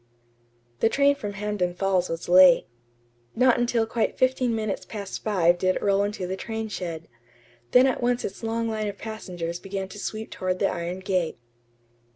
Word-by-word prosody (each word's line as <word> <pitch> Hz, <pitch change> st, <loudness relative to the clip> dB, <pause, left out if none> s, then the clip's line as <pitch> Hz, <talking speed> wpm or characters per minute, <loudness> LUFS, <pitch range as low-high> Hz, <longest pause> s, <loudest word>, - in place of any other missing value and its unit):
The 225 Hz, -, +3 dB
train 280 Hz, +2 st, +4 dB
from 210 Hz, -8 st, -6 dB
Hampden 195 Hz, -3 st, -2 dB
Falls 185 Hz, -1 st, +1 dB
was 165 Hz, 0 st, -4 dB
late. 180 Hz, -1 st, +7 dB, 0.7 s
Not 250 Hz, 0 st, +4 dB
until 240 Hz, -1 st, +1 dB
quite 225 Hz, 0 st, -1 dB
fifteen 255 Hz, -2 st, +2 dB
minutes 215 Hz, -3 st, -2 dB
past 200 Hz, -3 st, -7 dB
five 175 Hz, -5 st, +3 dB
did 185 Hz, 0 st, +2 dB
it -, -, -3 dB
roll 200 Hz, -1 st, +3 dB
into 205 Hz, -2 st, -2 dB
the 185 Hz, +1 st, -3 dB
train 220 Hz, +2 st, -5 dB
shed. 170 Hz, -5 st, -5 dB, 0.6 s
Then 250 Hz, +1 st, +6 dB
at 265 Hz, -, 0 dB
once 245 Hz, 0 st, +1 dB
its 195 Hz, -, -6 dB
long 230 Hz, 0 st, -1 dB
line 215 Hz, -1 st, -2 dB
of 205 Hz, -, -5 dB
passengers 175 Hz, -6 st, -5 dB
began 195 Hz, 0 st, -5 dB
to 205 Hz, -, -10 dB
sweep 220 Hz, +2 st, -5 dB
toward 185 Hz, 0 st, -2 dB
the 195 Hz, -, +2 dB
iron 175 Hz, +2 st, -4 dB
gate. 185 Hz, -3 st, -1 dB
200 Hz, 180 wpm, -25 LUFS, 185-225 Hz, 0.7 s, late